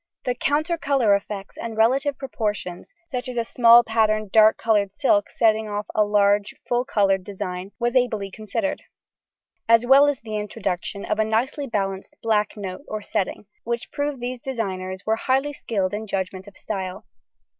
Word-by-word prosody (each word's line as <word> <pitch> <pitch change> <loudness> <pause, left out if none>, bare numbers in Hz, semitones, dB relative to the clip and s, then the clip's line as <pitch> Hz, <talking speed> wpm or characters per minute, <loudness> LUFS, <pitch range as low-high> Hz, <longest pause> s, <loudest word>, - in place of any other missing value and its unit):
The 250 - +1
counter 310 +6 0
colour 265 -9 +3
effects 200 0 -3
and 225 -1 -5
relative 265 +5 +2
proportions, 210 -9 -4
such 255 -6 -5
as 250 - -6
a 235 - +2
small 235 +1 +6
patterned, 215 -2 +1
dull 220 0 +7
coloured 205 -3 +1
silk 210 -7 +2
setting 220 -1 +2
off 205 0 -3
a 215 - +4
large 205 0 +2
full 245 +1 +1
coloured 195 -7 +2
design 190 -1 -5
was 240 +1 -1
ably 220 -6 +1
considered, 220 - -3 0.9
as 230 +1 +6
well 275 +3 +7
as 290 -3 0
the 215 -1 -4
introduction 205 -2 -4
of 215 - -1
a - - +5
nicely 245 +6 -1
balanced 195 -4 -3
black 215 -2 +1
note 190 0 -6
or 215 -1 -5
setting, 210 -1 -2 0.2
which 235 0 -4
proved 285 -2 -2
these 245 +1 -4
designers 190 -7 -4
were 220 +1 +1
highly 270 +4 0
skilled 200 -8 -2
in 215 +1 -4
judgment 190 0 -3
of 205 - -14
style. 190 -3 -5
220 Hz, 165 wpm, -23 LUFS, 200-245 Hz, 0.9 s, dull